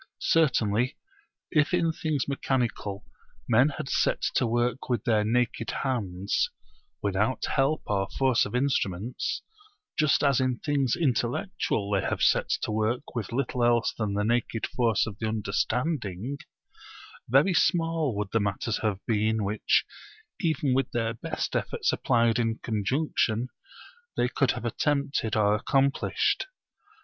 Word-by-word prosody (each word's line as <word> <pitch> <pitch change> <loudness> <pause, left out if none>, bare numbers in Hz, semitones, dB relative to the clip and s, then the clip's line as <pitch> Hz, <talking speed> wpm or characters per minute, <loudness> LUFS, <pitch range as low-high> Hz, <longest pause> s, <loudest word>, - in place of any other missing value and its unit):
Certainly 125 -7 +2 0.5
if 155 +2 +3
in 170 -2 +2
things 155 -4 -2
mechanical 120 -7 -2 0.4
men 125 +6 +5
had - - -4
set - - +1
to 125 - +2
work 120 +2 -1
with 120 -4 0
their 110 -4 +2
naked 115 +1 0
hands, 100 -7 -1 0.5
without 105 +5 0
help 140 +4 +1
or 100 -2 0
force 130 -3 +3
of - - -4
instruments, 125 -5 -1 0.5
just 150 -1 +3
as 140 -3 +3
in 130 -1 0
things 140 -4 0
intellectual 120 - 0
they 100 -2 +2
have - - -1
set - - +3
to - - -1
work 110 +3 -1
with 115 -6 -4
little 125 0 -1
else 120 -1 +3
than 105 -3 -2
the 105 - +1
naked 115 0 0
forces 115 -4 +1
of 100 -3 -8
the 110 - -1
understanding, 110 - -2 0.9
very 140 +10 +4
small 165 - +1
would 105 -1 -2
the 115 - +3
matters 100 +2 -1
have 105 -3 -2
been 110 0 +1
which, 105 +2 +1 0.5
even 160 -7 +1
with 135 0 +1
their 115 -1 0
best 115 - -4
efforts - - 0
applied 115 -1 +2
in 115 -1 0
conjunction, 115 +1 0 0.7
they 120 - +3
could 135 +1 +1
have 120 -1 -6
attempted 140 -2 0
or 105 -1 +3
accomplished. 135 - +1
120 Hz, 140 wpm, -27 LUFS, 110-135 Hz, 0.9 s, men